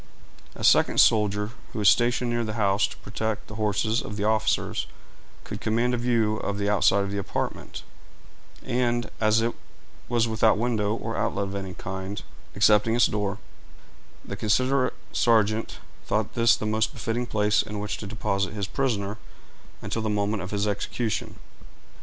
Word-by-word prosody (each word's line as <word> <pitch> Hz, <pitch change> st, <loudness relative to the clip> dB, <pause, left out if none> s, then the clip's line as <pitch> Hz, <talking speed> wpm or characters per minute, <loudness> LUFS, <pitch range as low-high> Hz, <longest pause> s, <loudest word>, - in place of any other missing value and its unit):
A -, -, -8 dB
second -, -, +4 dB
soldier, 105 Hz, -1 st, +3 dB, 0.2 s
who -, -, -8 dB
was 105 Hz, -2 st, +2 dB
stationed 120 Hz, +1 st, +3 dB
near 120 Hz, 0 st, 0 dB
the 110 Hz, -1 st, -3 dB
house 100 Hz, -1 st, +2 dB
to -, -, -11 dB
protect 110 Hz, +1 st, -4 dB
the -, -, -11 dB
horses 110 Hz, +1 st, 0 dB
of 105 Hz, -, -7 dB
the 100 Hz, -, -2 dB
officers, 110 Hz, 0 st, 0 dB, 0.6 s
could -, -, -7 dB
command 115 Hz, +3 st, +1 dB
a -, -, +1 dB
view 115 Hz, -3 st, +1 dB
of 100 Hz, -1 st, -3 dB
the 100 Hz, 0 st, -1 dB
outside 100 Hz, -1 st, +3 dB
of 100 Hz, -, -4 dB
the 100 Hz, -, -2 dB
apartment; 100 Hz, -, -4 dB, 0.8 s
and, 120 Hz, -1 st, 0 dB
as 110 Hz, +1 st, +4 dB
it 115 Hz, +1 st, 0 dB, 0.6 s
was 120 Hz, -1 st, +2 dB
without 110 Hz, -2 st, +3 dB
window 110 Hz, -2 st, 0 dB
or -, -, -4 dB
outlet 100 Hz, -, -1 dB
of -, -, -6 dB
any 95 Hz, -2 st, -5 dB
kind, 95 Hz, +1 st, -5 dB, 0.3 s
excepting 105 Hz, +2 st, +4 dB
its 120 Hz, -, +5 dB
door, 105 Hz, -1 st, -1 dB, 0.9 s
the -, -, -5 dB
considerate 130 Hz, +4 st, +1 dB, 0.2 s
sergeant 110 Hz, -1 st, +2 dB, 0.3 s
thought -, -, 0 dB
this 115 Hz, -2 st, +4 dB
the -, -, -5 dB
most 110 Hz, +1 st, 0 dB
befitting 120 Hz, +1 st, -2 dB
place 105 Hz, -1 st, +2 dB
in 105 Hz, -, -6 dB
which 105 Hz, 0 st, -3 dB
to 105 Hz, -, -7 dB
deposit 100 Hz, -1 st, -2 dB
his 100 Hz, -2 st, -2 dB
prisoner 105 Hz, -4 st, -2 dB, 0.6 s
until 115 Hz, -, -2 dB
the 110 Hz, -, -1 dB
moment 105 Hz, 0 st, 0 dB
of 95 Hz, -, -6 dB
his 100 Hz, 0 st, -1 dB
execution. 105 Hz, +2 st, -2 dB
110 Hz, 165 wpm, -26 LUFS, 100-115 Hz, 0.9 s, its